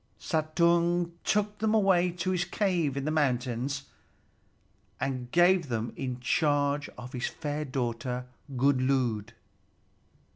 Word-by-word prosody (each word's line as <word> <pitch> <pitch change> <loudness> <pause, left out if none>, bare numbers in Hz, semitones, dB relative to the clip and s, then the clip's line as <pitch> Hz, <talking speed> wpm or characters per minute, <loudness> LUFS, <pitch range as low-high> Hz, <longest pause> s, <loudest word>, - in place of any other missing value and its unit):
Suttung 170 +2 +2
took 210 0 0
them 220 +1 +2
away 190 -4 +4
to 180 +1 -2
his 180 -1 +1
cave 175 -7 0
in 140 - -2
the 155 - 0
mountains, 135 -2 0 1.2
and 130 -2 -3
gave 175 -1 +4
them 115 -1 -2
in 125 -2 -4
charge 145 +2 +1
of 125 +1 -9
his 125 -1 -2
fair 150 0 -4
daughter 125 -1 -3 0.3
Gunnlöd. 130 -4 +1
145 Hz, 115 wpm, -29 LUFS, 125-175 Hz, 1.2 s, away